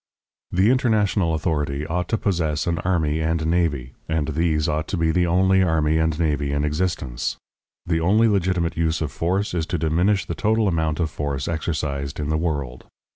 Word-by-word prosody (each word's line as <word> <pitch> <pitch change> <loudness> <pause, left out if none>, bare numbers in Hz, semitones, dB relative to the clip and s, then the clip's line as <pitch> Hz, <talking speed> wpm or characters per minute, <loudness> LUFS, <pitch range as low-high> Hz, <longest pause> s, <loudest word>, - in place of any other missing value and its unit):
The 95 +6 +3
international 105 -9 +2
authority 75 -3 -1
ought 90 +2 -2
to 115 - 0
possess 85 -8 -1
an 85 -2 -1
army 80 -4 0
and 80 0 0
navy, 80 -6 0 0.2
and 80 -2 0
these 80 0 +1
ought 75 +1 -1
to 95 - -2
be 80 -1 +2
the 90 +1 +2
only 95 +2 +3
army 80 -3 +2
and 80 0 0
navy 75 -3 0
in 70 +1 0
existence. 75 -5 -2 0.5
The 85 -1 0
only 105 +7 +4
legitimate 90 -4 +1
use 80 -1 0
of 75 -3 -2
force 90 +6 -1
is 85 -2 -1
to 90 - -1
diminish 85 +4 +1
the - - -4
total 110 +6 +1
amount 80 -3 0
of 80 -3 0
force 70 -3 -3
exercised 75 -4 -3
in 75 0 -2
the 80 - +1
world. 70 -7 -3
80 Hz, 180 wpm, -23 LUFS, 75-90 Hz, 0.5 s, only